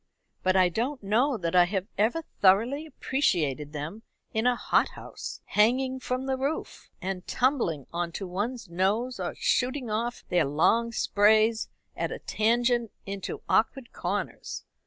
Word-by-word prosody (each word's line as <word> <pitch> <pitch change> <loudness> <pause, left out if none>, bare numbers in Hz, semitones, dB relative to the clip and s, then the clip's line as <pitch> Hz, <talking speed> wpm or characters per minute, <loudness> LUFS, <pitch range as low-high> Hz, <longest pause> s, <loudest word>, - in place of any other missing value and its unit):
But 185 0 +2
I 185 -1 +6
don't 240 - -2
know 240 +7 +2
that 170 -2 -2
I 180 -1 +7
have 190 0 -2
ever 235 +11 +1 0.2
thoroughly 230 +11 +4
appreciated 160 - 0
them 155 +8 -6 0.3
in 220 +2 +1
a 250 - +4
hothouse, - - -2
hanging 255 +5 +2
from 255 +1 -2
the 265 -1 0
roof, 275 +4 -4
and 185 -1 -4
tumbling 240 - +1
on 170 0 -2
to 195 - -4
one's 210 +6 -3
nose, 205 +9 0
or - - -3
shooting 250 -2 0
off 235 +3 -2
their 175 -3 +3
long 225 +12 +2
sprays 220 0 +3 0.3
at - - -2
a - - -4
tangent 235 +1 +1 0.2
into 195 -1 -5
awkward 240 +2 +1
corners. - - -4
220 Hz, 145 wpm, -28 LUFS, 185-250 Hz, 0.3 s, I